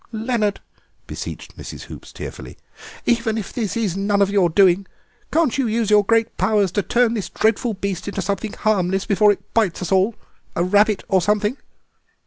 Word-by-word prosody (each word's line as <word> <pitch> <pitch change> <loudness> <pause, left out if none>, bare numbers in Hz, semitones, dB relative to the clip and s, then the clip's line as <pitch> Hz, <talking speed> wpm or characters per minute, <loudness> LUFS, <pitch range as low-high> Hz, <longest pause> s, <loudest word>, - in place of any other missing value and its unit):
"Leonard," 220 -2 -1 0.4
beseeched - - -7
Mrs. - - -8
Hoops - - -11
tearfully, - - -9 0.5
"even 230 -2 +1
if 210 - -5
this 230 -2 -2
is 205 -6 -1
none 200 +1 +1
of 200 0 +3
your 195 -4 +3
doing 190 +2 +4 0.4
can't 315 -5 +1
you 260 - +1
use 220 -1 0
your 210 -1 +6
great 225 +2 +1
powers 205 -4 +2
to 205 - 0
turn 235 +3 +2
this 200 -6 -3
dreadful 220 +1 0
beast 190 -1 -4
into 200 - -4
something 200 +2 -3
harmless 195 -3 0
before 210 +1 +4
it 200 - -6
bites 200 -6 +1
us 180 - -4
all—a 190 -3 -1
rabbit 205 +2 +3
or 190 -2 +3
something?" 210 +4 +1
205 Hz, 170 wpm, -21 LUFS, 195-225 Hz, 0.5 s, your